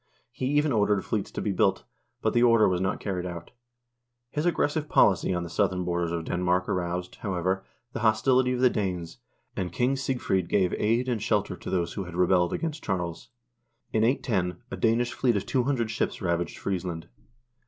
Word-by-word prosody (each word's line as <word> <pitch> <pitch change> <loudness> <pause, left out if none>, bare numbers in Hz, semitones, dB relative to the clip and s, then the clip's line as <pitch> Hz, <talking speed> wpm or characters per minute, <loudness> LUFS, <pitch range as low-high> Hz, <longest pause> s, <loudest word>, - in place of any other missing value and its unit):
He 130 - -3
even 145 +2 +2
ordered 105 -4 +2
fleets - - -2
to - - -5
be - - 0
built, - - +2 0.4
but - - +2
the 120 - +3
order 115 -3 +6
was 90 -1 0
not 95 +1 -1
carried 90 -3 -3
out. 85 -2 -8 0.8
His 150 +3 -1
aggressive 150 -2 0
policy 95 -3 +4
on 90 -1 -1
the - - -5
southern 95 -3 0
borders 85 -1 -1
of 85 -1 -2
Denmark 90 +1 0
aroused, 90 0 -2
however, 95 -1 -1 0.3
the - - -3
hostility 125 +3 +3
of 125 - -2
the 130 - +6
Danes, 90 - -3 0.4
and 90 -2 -3
King 125 +8 +1
Sigfred 125 -9 -1
gave 95 -3 +2
aid 115 +4 +1
and 120 -4 -1
shelter 105 -4 0
to - - -8
those 85 -2 -1
who 100 - -4
had 85 -1 -9
rebelled 90 0 +3
against 160 -2 -3
Charles. 90 -4 -3 0.6
In 110 - +3
810 105 -6 0
a - - -2
Danish 120 +1 +1
fleet 120 -1 +1
of 100 - -3
200 125 -2 0
ships - - -2
ravaged 85 -2 -1
Friesland. 90 -4 -3
95 Hz, 185 wpm, -27 LUFS, 90-120 Hz, 0.8 s, order